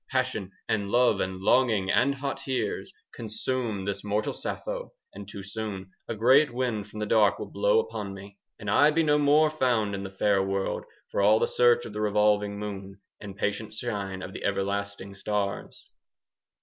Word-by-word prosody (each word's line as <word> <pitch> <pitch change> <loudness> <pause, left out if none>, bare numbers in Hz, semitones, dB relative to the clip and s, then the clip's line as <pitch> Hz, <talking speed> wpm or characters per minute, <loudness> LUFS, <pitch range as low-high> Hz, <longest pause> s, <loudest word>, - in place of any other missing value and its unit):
10 130 - +2
Passion 110 -7 -6 0.2
and 100 -2 0
love 120 -3 +3
and 95 0 -2
longing 110 -4 +3
and 140 +2 +3
hot 140 0 -3
tears 125 -6 -3 0.2
Consume 110 -2 -3
this 100 0 -2
mortal 105 +1 -1
Sappho, - - -5 0.2
and 100 -1 -9
too 100 -1 -8
soon 100 -2 -6 0.2
A 115 - -3
great 130 +6 +5
wind 120 -5 -2
from 105 - -12
the 105 - -1
dark 105 -1 +4
will - - -7
blow - - +2
upon 275 - -2
me, 100 +1 -12 0.2
And 105 - -9
I 145 +8 +5
be 165 +2 +2
no 150 -1 +3
more 150 +2 +4
found 120 -8 +1
in 100 - -3
the 95 - -5
fair 100 +1 +2
world, 95 0 -2 0.3
For - - 0
all 105 +2 +6
the - - +2
search 120 -1 +3
of 110 - -8
the 105 - -3
revolving 105 -1 +2
moon 100 -1 -6 0.2
15 105 - -8
And 95 - -10
patient 105 +2 -2
shine 100 -5 -3
of 95 - -8
everlasting 100 0 -2
stars. 100 0 -3
105 Hz, 185 wpm, -27 LUFS, 100-125 Hz, 0.3 s, all